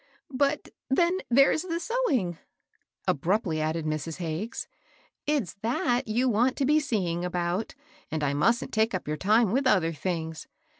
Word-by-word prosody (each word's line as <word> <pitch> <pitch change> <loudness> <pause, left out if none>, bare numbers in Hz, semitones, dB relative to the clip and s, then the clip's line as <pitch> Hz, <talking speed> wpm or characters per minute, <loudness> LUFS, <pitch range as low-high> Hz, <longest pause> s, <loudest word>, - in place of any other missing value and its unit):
" - - -28
But 280 +2 0 0.2
then 345 +7 +3
there's 275 +5 +5
the 335 -2 -3
sewing," 295 - 0 0.7
abruptly 165 +1 +1
added 155 +1 -1
Mrs. 155 +1 -3
Hagges; 175 +6 -4 0.3
" - - -32 0.2
it's 285 - 0
that 240 +1 0
you 240 +4 +1
want 245 +3 +2
to 275 - +1
be 300 +3 +4
seeing 185 - -1
about, 180 +3 -2 0.3
and 155 -1 -2
I 140 -1 +1
musn't 230 +12 +1
take 220 -2 +2
up 180 - -4
your 150 0 -2
time 215 +4 +3
with 265 +3 +2
other 170 -8 +3
things. 160 0 -4
210 Hz, 160 wpm, -27 LUFS, 165-260 Hz, 0.7 s, there's